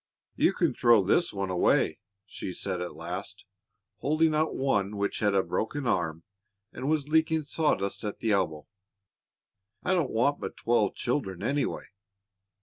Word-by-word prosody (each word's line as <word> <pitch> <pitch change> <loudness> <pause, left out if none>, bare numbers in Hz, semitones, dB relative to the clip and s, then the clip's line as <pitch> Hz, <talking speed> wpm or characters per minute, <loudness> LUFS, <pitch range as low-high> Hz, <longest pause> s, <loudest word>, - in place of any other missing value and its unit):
"You - - +3
can - - +1
throw 115 -4 +5
this 140 - +2
one 100 -2 -3
away," 90 - +2 0.3
she 95 -2 -6
said 90 0 -3
at 90 - -5
last, 90 +4 -6 0.5
holding 155 +2 +2
out 155 +1 +1
one 105 -7 0
which 100 0 -1
had 105 -2 +2
a 95 - +3
broken 135 +5 -2
arm, 85 -7 0 0.5
and 135 - -3
was 155 -2 +1
leaking 160 0 +2
sawdust 140 -10 0
at 105 -1 -4
the 110 - -1
elbow; 80 -7 0 1.2
"I 185 - +1
don't 170 -8 +1
want 135 +6 +1
but - - -6
twelve 120 +1 +1
children, 120 -8 -2
anyway." 140 +1 -1
110 Hz, 150 wpm, -28 LUFS, 95-145 Hz, 1.2 s, throw